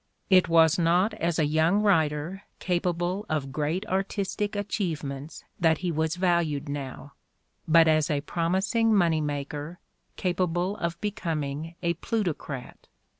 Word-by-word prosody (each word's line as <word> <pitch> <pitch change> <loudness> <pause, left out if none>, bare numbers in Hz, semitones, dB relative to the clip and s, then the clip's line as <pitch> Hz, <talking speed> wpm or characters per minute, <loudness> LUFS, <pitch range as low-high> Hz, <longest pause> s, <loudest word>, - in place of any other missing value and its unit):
It 185 -2 +6
was 165 +1 +5
not 175 +6 +3
as 170 -6 -1
a 155 - +3
young 160 +7 +2
writer 165 -1 +1 0.2
capable 180 +2 -1
of 145 -4 -2
great 155 +8 -1
artistic 200 +1 -2
achievements 160 -8 -4 0.2
that 160 -2 +3
he 175 - +1
was 160 +1 0
valued 170 -5 +1
now, 140 0 -6 0.5
but 165 0 +6
as 155 -1 +3
a 145 -1 0
promising 190 +8 +1
money 165 -5 +3
maker 145 +2 -4 0.4
capable 180 +1 0
of 170 0 -3
becoming 165 -6 -3
a 170 0 +2
plutocrat. 170 - -4
165 Hz, 125 wpm, -27 LUFS, 150-185 Hz, 0.5 s, It